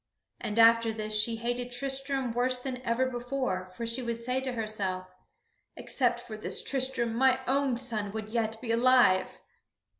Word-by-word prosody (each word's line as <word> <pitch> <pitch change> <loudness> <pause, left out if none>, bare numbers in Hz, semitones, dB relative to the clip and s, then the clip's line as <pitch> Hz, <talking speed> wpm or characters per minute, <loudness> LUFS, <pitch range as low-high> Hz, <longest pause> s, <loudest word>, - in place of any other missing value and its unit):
And 210 - -4
after 230 0 +6
this 215 -1 -4
she 215 +2 +2
hated 245 +2 -3
Tristram 270 -1 -2
worse 250 +2 +1
than 250 0 -5
ever 245 +1 +1
before, 245 -7 -3
for 235 - -4
she 230 +3 0
would 235 -1 -4
say 255 +2 0
to 260 -1 -3
herself: 205 -5 -3 0.7
"Except 245 -3 0
for 240 -2 -8
this 215 - -2
Tristram, 260 -4 0
my 260 +2 +3
own 270 -1 +1
son 220 -5 0
would 215 0 -5
yet 225 -1 -1
be 235 -3 -2
alive!" 240 -5 +4
240 Hz, 160 wpm, -29 LUFS, 225-255 Hz, 0.7 s, after